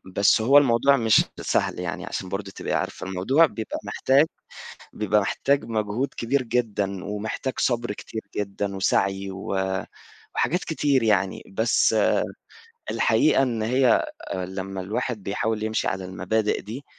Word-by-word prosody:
بس 100 +2 +4
هو 135 +6 +6
الموضوع 140 0 +5
مش 110 -3 +4 0.2
سهل - - 0
يعني - - -4
عشان 95 - -5
برضه 100 +1 -4
تبقي - - -4
عارفة - - -2
الموضوع 95 - +3
بيبقى 115 -7 -5
محتاج 135 +3 +3 0.7
بيبقى 105 0 +2
محتاج 140 +7 0
مجهود 110 +3 -2
كبير 130 +3 0
جدًا 105 -5 -1
ومحتاج 105 +5 -3
صبر 120 -2 0
كتير 110 +1 -7 0.2
جدًا 100 0 -3
وسعي 95 0 +1
و 95 0 -8 0.9
وحاجات 180 +4 +1
كتير 145 -5 +1
يعني 100 -4 +1
بس 110 +4 +3 1.0
الحقيقة 295 - +3
إن 120 -4 -1
هي 125 +2 +3 0.3
لمّا 95 +1 -4
الواحد 105 +3 -3
بيحاول 105 +3 -2
يمشي 110 0 -1
على 95 0 -2
المبادئ 95 +4 -1
دي 120 +7 -8
110 Hz, 135 wpm, -24 LUFS, 100-125 Hz, 1.0 s, هو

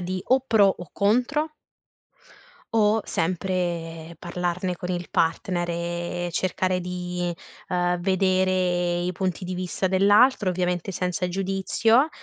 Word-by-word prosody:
di 185 +1 -3
o 260 +1 +5
pro 225 -6 +4
o 175 - -8
contro 250 +9 +1 1.2
o, 215 0 +4
sempre, 170 -2 -2
parlarne 180 +1 -2
con 180 +1 -5
il 175 -1 -3
partner 175 +2 0
e 175 +1 -3
cercare 185 +1 0
di, 180 -1 -3 0.3
ehm, 180 -1 +1
vedere 185 -2 +1
i 180 - 0
punti 185 0 -2
di 185 - -3
vista 185 +1 -2
dell'altro, 205 +3 +4
ovviamente, 180 +1 -1
senza 180 0 -2
il 180 - -1
giudizio, 195 - +2
180 Hz, 125 wpm, -25 LUFS, 175-195 Hz, 1.2 s, o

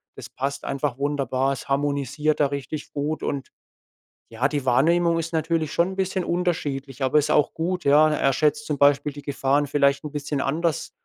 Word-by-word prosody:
Das - - -9
passt 140 +1 -4
einfach 140 -2 -2
wunderbar. 135 -2 0
Es 135 - -8
harmonisiert 140 +2 0
da 145 - +4
richtig 140 +2 -6
gut. 150 +2 -3
Und, 140 -2 -3 0.8
ja, 115 +4 0
die 145 -3 -3
Wahrnehmung 165 +7 +3
ist 165 0 -4
natürlich 160 -1 0
schon 170 +2 +2
'n - - -9
bisschen 190 -1 -1
unterschiedlich, 145 -7 -2
aber 130 +3 +4
ist 145 - -1
ja - - +3
auch 150 - +2
gut, 180 +2 -2
ja? 150 +2 +6
Er 135 -2 +2
schätzt 155 - +1
zum 150 - -1
Beispiel 145 +1 +3
die 145 - -9
Gefahren 140 0 +1
vielleicht 140 0 +2
'n 150 - -6
bisschen 145 -1 -3
anders 160 +3 -1
145 Hz, 190 wpm, -24 LUFS, 140-155 Hz, 0.8 s, ja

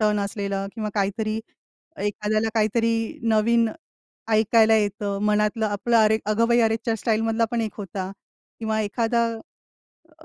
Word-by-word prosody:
Turn 210 -1 +2
असलेलं. 200 -1 -3
किंवा 215 -2 -3
काहीतरी, 215 +2 -1 0.6
एखाद्याला 210 +2 -1
काहीतरी 225 +1 +2 0.4
नवीन 225 +1 +3 0.6
ऐकायला 220 +1 +4
येतं, 205 -1 -1
मनातलं 210 +1 +1
आपलं. 215 +3 0
अरे, 220 0 +4
अगं 225 +2 +2
बाई 235 0 +4
अरेच्चा! 225 +1 +1
स्टाईलमधला 225 +1 +1
पण 235 -1 0
एक 220 -2 -3
होता. 190 -1 -5 0.5
किंवा 220 -1 -1
एखादा 230 +2 0 0.9
अ, 320 - -17
220 Hz, 130 wpm, -24 LUFS, 210-225 Hz, 0.9 s, ऐकायला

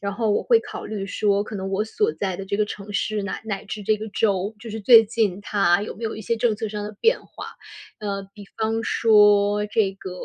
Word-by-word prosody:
然 200 0 -3
后 220 0 0
我 - - +1
会 465 -2 +4
考 - - -8
虑 205 -2 -5
说 200 0 +1
可 210 0 -7
能 190 0 -4
我 195 +2 0
所 420 - 0
在 190 -3 -3
的 195 - -6
这 200 +2 -3
个 210 - +2
城 205 0 -8
市， 210 +3 -1
乃 200 - -4
乃 205 -1 -4
至 205 +2 -6
这 215 +2 +2
个 215 - -7
州， 200 0 0
就 230 - -9
是 220 0 -5
最 230 +1 +8
近 210 -4 0
它 200 -3 +2
有 210 - -6
没 230 - -7
有 220 - -2
一 - - -7
些 225 +3 -1
政 225 -1 +1
策 220 +1 -4
上 210 0 -5
的 210 0 -7
变 460 +2 +3
化。 - - -10 0.5
呃， 200 -2 -3
比 205 -1 -11
方 225 +1 0
说 210 -2 +4
这 205 -2 +1
个 190 -1 -9
210 Hz, 265 characters per minute, -23 LUFS, 200-220 Hz, 0.5 s, 最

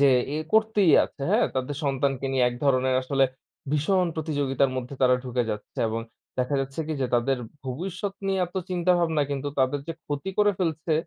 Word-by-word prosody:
যে 140 - +6 0.5
করতেই 220 -5 +4
আছে। - - -14
হ্যাঁ - - +4
তাদের 130 +2 -2
সন্তানকে 135 -1 0
নিয়ে 130 -2 +3
এক 120 - -5
ধরনের 130 -1 +3
আসলে 135 +1 +2 0.5
ভীষণ 180 +5 +2
প্রতিযোগিতার 140 -4 0
মধ্যে 130 +2 -4
তারা 125 0 +6
ঢুকে 125 -1 0
যাচ্ছে। 105 0 -7
এবং 115 +1 -2 0.4
দেখা 125 +3 0
যাচ্ছে 135 +3 -4
কি - - -1
যে - - +2
তাদের 125 +2 +2 0.3
ভবিষ্যৎ 185 +9 -4
নিয়ে 195 -1 +1
এত 175 - -20 0.2
চিন্তাভাবনা 175 -3 +2
কিন্তু 140 0 -2
তাদের 135 +2 +2
যে - - -1
ক্ষতি 145 +6 -3
করে 205 0 +5
ফেলছে, 160 -2 -1
140 Hz, 175 wpm, -26 LUFS, 130-170 Hz, 0.5 s, যে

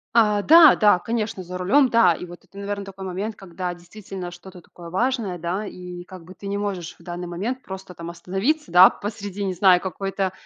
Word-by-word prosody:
А, 210 -3 +4
да, 325 0 +8
да, 205 -4 +4
конечно, 220 -2 -3
за 180 +1 -7
рулем. 255 +9 +3
Да, 230 -7 +5
и 180 - -7
вот 175 0 -13
это, 200 - -18
наверно, 200 0 -4
такой 195 0 -10
момент, 200 +4 -4
когда 180 -1 -5
действительно 180 +1 -9
что-то 175 +1 -13
такое 170 0 -13
важное, 225 -4 -1
да, 180 +5 -3
и 180 -2 -8
как 180 -1 -12
бы 185 +3 -13
ты 200 - -13
не 200 0 -2
можешь 190 -5 -4
в - - -18
данный 175 0 -6
момент 215 +10 -4
просто 190 -2 -9
там 170 0 -7
остановиться, 195 - -2
да, 180 +2 +9
посреди, 205 -1 -6
не 190 -1 -1
знаю, 180 -1 +5
какой-то, 195 0 -3
190 Hz, 205 wpm, -23 LUFS, 180-205 Hz, -, да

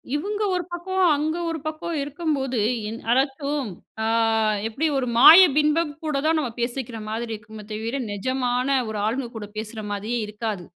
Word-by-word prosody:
இவுங்க 410 +8 -2
ஒரு 360 - -1
பக்கம், 375 +2 -1
அங்க 310 +3 -1
ஒரு 325 -1 -3
பக்கம் 315 +2 -4
இருக்கும்போது, 280 -4 -2 0.3
இன் 225 +2 -5
அதாச்சும் 275 0 0 0.3
ஆ - - 0 0.6
எப்படி 270 +9 -1
ஒரு 260 -2 -1
மாய 325 +9 +10 0.2
பிம்பம் 305 +1 +2
கூட 305 -3 -1
தான் 320 +1 +3
நம்ம 260 -6 -2
பேசிக்கிற 240 -1 -3
மாதிரி 225 +1 -3
இருக்குமே 215 0 -11
தவிர, 225 +5 -3
நெஜமான 250 +5 0
ஒரு 215 -1 -3
ஆளுங்க 240 +3 -1
கூட 210 -2 -6
பேசுற 215 0 -5
மாதிரியே 215 +4 -2
இருக்காது. 210 -3 -4
265 Hz, 155 wpm, -24 LUFS, 225-305 Hz, 0.6 s, மாய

